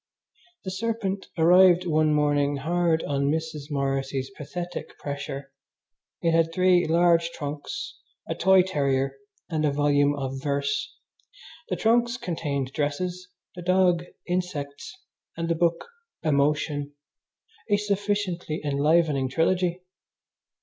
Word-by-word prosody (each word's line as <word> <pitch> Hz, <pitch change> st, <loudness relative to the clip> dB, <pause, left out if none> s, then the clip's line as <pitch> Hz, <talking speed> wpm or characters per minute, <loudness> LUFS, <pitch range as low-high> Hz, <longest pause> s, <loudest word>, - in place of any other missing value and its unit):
The 190 Hz, -, -4 dB
serpent 200 Hz, -1 st, -2 dB
arrived 180 Hz, +2 st, +6 dB
one 155 Hz, -2 st, +2 dB
morning 145 Hz, -1 st, +2 dB
hard 165 Hz, +3 st, +1 dB
on 140 Hz, 0 st, 0 dB
Mrs. 155 Hz, -1 st, -3 dB
Morrissy's 135 Hz, -1 st, -2 dB
pathetic 175 Hz, +4 st, -6 dB
pressure. 140 Hz, -1 st, -6 dB, 0.7 s
It 165 Hz, -, +3 dB
had 165 Hz, 0 st, +3 dB
three 180 Hz, -1 st, +3 dB
large 170 Hz, 0 st, +3 dB
trunks, 150 Hz, -, -6 dB, 0.3 s
a -, -, -1 dB
toy 190 Hz, -1 st, +5 dB
terrier, 140 Hz, -6 st, 0 dB, 0.3 s
and 155 Hz, -3 st, -1 dB
a 150 Hz, -, +3 dB
volume 145 Hz, 0 st, +2 dB
of 135 Hz, -1 st, -4 dB
verse. 140 Hz, 0 st, -2 dB, 0.7 s
The -, -, 0 dB
trunks 235 Hz, +2 st, +2 dB
contained 145 Hz, -, -3 dB
dresses, 180 Hz, +5 st, -2 dB, 0.3 s
the 180 Hz, -, -8 dB
dog 180 Hz, -1 st, +3 dB, 0.2 s
insects, 175 Hz, -, -4 dB, 0.4 s
and 165 Hz, 0 st, -2 dB
the 165 Hz, -, +2 dB
book 170 Hz, 0 st, 0 dB, 0.4 s
emotion 145 Hz, 0 st, +1 dB, 0.8 s
a 205 Hz, -, +4 dB
sufficiently 200 Hz, -5 st, -1 dB
enlivening 145 Hz, -1 st, +2 dB
trilogy! 175 Hz, +5 st, +1 dB
160 Hz, 115 wpm, -26 LUFS, 145-180 Hz, 0.8 s, arrived